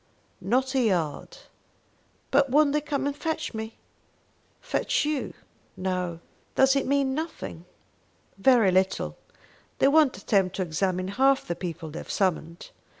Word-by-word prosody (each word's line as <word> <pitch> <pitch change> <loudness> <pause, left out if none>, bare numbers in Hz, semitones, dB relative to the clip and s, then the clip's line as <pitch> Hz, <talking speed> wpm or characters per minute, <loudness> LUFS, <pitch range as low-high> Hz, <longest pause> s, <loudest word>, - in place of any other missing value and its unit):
"Not 255 +8 +1
a 265 - +2
yard." 175 -10 -1 0.9
"But 275 0 +4
won't 290 +2 +4
they 300 - +1
come 290 -2 -2
and 285 0 -1
fetch 315 0 -3
me?" 220 0 -6 0.8
"Fetch - - 0
you? 300 -2 -2 0.4
No." 180 -2 -2 0.3
"Does 265 +1 +5
it 275 - 0
mean 275 -1 +1
nothing." 305 - -5 0.7
"Very 225 -1 +4
little. 190 +1 +1 0.6
They - - +4
won't 295 -6 +4
attempt 195 -2 +1
to 190 - -1
examine 185 +2 -1
half 265 +6 +2
the 170 - -2
people 165 -3 -6
they 160 - -6
have - - -10
summoned. 170 -3 -2
220 Hz, 140 wpm, -26 LUFS, 185-280 Hz, 0.9 s, Does